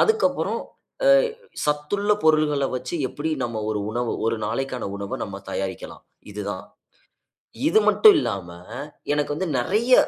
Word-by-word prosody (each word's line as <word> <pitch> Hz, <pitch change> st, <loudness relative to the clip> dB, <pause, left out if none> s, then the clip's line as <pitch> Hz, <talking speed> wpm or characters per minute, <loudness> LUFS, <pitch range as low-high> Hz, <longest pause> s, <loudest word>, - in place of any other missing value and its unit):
அதுக்கப்புறம் 440 Hz, -1 st, +2 dB, 0.5 s
அ -, -, +7 dB, 0.6 s
சத்துள்ள 150 Hz, +8 st, +1 dB
பொருள்கள 155 Hz, -3 st, +3 dB
வச்சு, 125 Hz, +5 st, -5 dB
எப்பிடி 155 Hz, +4 st, -3 dB
நம்ம 115 Hz, -2 st, -3 dB
ஒரு 105 Hz, -1 st, -1 dB
உணவு, 120 Hz, 0 st, -1 dB
ஒரு 115 Hz, 0 st, +1 dB
நாளைக்கான 125 Hz, +3 st, -2 dB
உணவ 100 Hz, -1 st, -4 dB
நம்ம 100 Hz, 0 st, -7 dB
தயாரிக்கலாம். 95 Hz, -2 st, -5 dB, 0.3 s
இதுதான். 100 Hz, -2 st, -4 dB, 1.0 s
இது 425 Hz, +7 st, +5 dB
மட்டும் 430 Hz, -2 st, +8 dB
இல்லாம, 95 Hz, -, -3 dB, 0.6 s
எனக்கு 145 Hz, 0 st, 0 dB
வந்து 185 Hz, +5 st, -2 dB
நிறைய 215 Hz, -, +2 dB
135 Hz, 125 wpm, -24 LUFS, 105-160 Hz, 1.0 s, மட்டும்